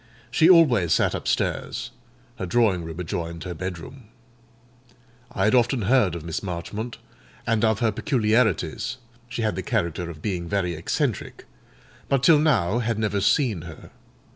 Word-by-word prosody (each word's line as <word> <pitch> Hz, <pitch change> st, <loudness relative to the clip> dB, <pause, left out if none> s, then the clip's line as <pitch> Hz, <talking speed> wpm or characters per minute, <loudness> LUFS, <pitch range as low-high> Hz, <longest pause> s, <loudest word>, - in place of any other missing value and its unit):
She 160 Hz, +5 st, +4 dB
always 125 Hz, -, +5 dB
sat -, -, +2 dB
upstairs: -, -, -2 dB, 0.5 s
her 95 Hz, -, -4 dB
drawing 100 Hz, -5 st, +2 dB
room 80 Hz, +1 st, -7 dB
adjoined 85 Hz, -1 st, -4 dB
her 90 Hz, -, -5 dB
bed 90 Hz, +1 st, -5 dB
room. 125 Hz, +9 st, -11 dB, 1.3 s
I 95 Hz, -, -1 dB
had 105 Hz, -, +3 dB
often 120 Hz, -1 st, +2 dB
heard 105 Hz, -5 st, +3 dB
of 85 Hz, -2 st, -7 dB
Miss 80 Hz, -2 st, -3 dB
Marchmont, 105 Hz, +5 st, -5 dB, 0.5 s
and 115 Hz, -1 st, +1 dB
of 110 Hz, 0 st, +2 dB
her 115 Hz, -2 st, +3 dB
peculiarities 110 Hz, -, 0 dB, 0.3 s
(she 115 Hz, 0 st, -3 dB
had 110 Hz, -, 0 dB
the -, -, -3 dB
character 85 Hz, 0 st, -2 dB
of 80 Hz, -3 st, -9 dB
being 90 Hz, -5 st, -3 dB
very 95 Hz, -4 st, 0 dB
eccentric), 80 Hz, 0 st, -3 dB, 0.6 s
but 135 Hz, -2 st, +1 dB
till 155 Hz, +1 st, +6 dB
now 120 Hz, -, +2 dB
had 115 Hz, -2 st, -1 dB
never 105 Hz, -2 st, 0 dB
seen 110 Hz, -, +2 dB
her. -, -, -11 dB
105 Hz, 155 wpm, -24 LUFS, 85-120 Hz, 1.3 s, till